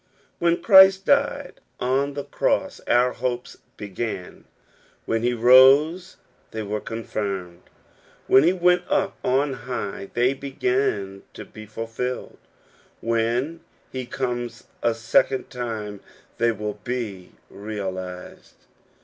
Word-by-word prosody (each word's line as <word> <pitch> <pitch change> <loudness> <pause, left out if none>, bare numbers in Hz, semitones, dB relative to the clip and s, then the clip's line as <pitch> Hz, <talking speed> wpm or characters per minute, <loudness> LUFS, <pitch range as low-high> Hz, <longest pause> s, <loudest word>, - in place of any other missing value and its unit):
When 170 0 +1
Christ 190 -1 +7
died 285 0 +1 0.2
on 135 +3 0
the 145 - -3
cross - - -1
our 125 +1 +3
hopes 125 0 -4 0.2
began, 105 -2 -6 0.6
when 115 0 0
he 120 +1 +1
rose 135 +9 +5 0.3
they 110 0 -5
were 105 +1 -3
confirmed, 100 -6 -5 0.6
when 130 - +6
he 165 +5 +4
went 180 -1 +3
up 195 0 0
on 135 +2 +1
high 115 -6 -5
they 125 +2 +3
began 125 -7 -2
to - - -8
be 110 0 -12
fulfilled, 115 +3 -5 0.6
when 115 +7 -1 0.3
he 130 -2 -5
comes 120 -2 -4 0.2
a 115 -1 +1
second 115 +3 +1
time 110 -5 -5 0.4
they 115 0 +3
will 105 -1 -5
be 110 -7 -5 0.2
realized. 95 -3 -7
120 Hz, 115 wpm, -23 LUFS, 105-135 Hz, 0.6 s, Christ